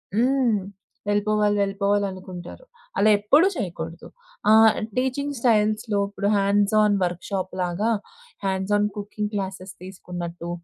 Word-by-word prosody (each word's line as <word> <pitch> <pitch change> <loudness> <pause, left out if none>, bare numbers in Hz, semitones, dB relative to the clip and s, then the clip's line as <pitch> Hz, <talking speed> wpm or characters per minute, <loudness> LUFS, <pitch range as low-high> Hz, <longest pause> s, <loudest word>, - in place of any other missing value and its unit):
హ్మ్. 245 -2 +2 0.5
వెళ్ళిపోవాలి, 205 0 +2
వెళ్ళిపోవాలనుకుంటారు. 195 - -2 0.3
అలా 215 - +4
ఎప్పుడూ 285 - +4
చేయకూడదు. 170 - -5 0.4
ఆహ్, 220 0 +7 0.2
టీచింగ్ 280 +2 -1
స్టైల్స్‌లో 215 -2 +2
ఇప్పుడు 200 0 -3
hands 200 +1 +2
on 210 -1 +3
work 175 0 -2
షాప్‌లాగా, 185 +1 -2 0.6
hands 190 +1 -1
on 210 0 +2
cooking 210 0 -4
classes 190 -2 -4
తీసుకున్నట్టు, 175 -2 -7
205 Hz, 105 wpm, -24 LUFS, 190-215 Hz, 0.6 s, ఆహ్